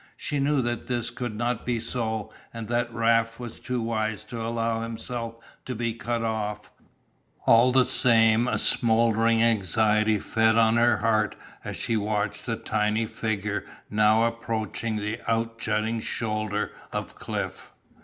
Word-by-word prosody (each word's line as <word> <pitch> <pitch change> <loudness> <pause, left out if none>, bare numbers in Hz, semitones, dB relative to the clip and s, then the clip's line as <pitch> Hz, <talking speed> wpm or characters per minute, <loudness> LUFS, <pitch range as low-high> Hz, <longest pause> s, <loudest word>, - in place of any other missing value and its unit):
She 145 - -2
knew 140 -1 +2
that 120 0 -3
this 120 -2 -1
could 120 -4 -5
not 120 +1 -1
be 120 -2 -1
so 110 -2 -3 0.2
and 115 -2 -6
that 120 0 0
Raft 115 0 +1
was 120 -2 -7
too 125 -1 -3
wise 110 -2 -2
to 115 +1 -6
allow 115 0 -1
himself 115 0 -4 0.3
to 125 - -4
be 115 0 -1
cut 115 0 -3
off, 105 -2 -3 0.7
all 115 +2 +6
the 130 0 +5
same 115 -2 +4
a - - +1
smouldering 115 0 +3
anxiety 110 0 +2
fed 110 +2 +2
on 115 0 +4
her 120 -1 +4
heart 110 -1 +1 0.3
as - - -5
she 115 - 0
watched 105 0 -2
the 115 - 0
tiny 110 +1 0
figure 105 -3 -2 0.3
now 105 +1 +4
approaching 115 -1 -2
the 105 +2 -3
out 115 0 -1
jutting 110 +1 0
shoulder 110 -2 -2 0.2
of - - -4
cliff. - - -5
115 Hz, 150 wpm, -26 LUFS, 110-115 Hz, 0.7 s, all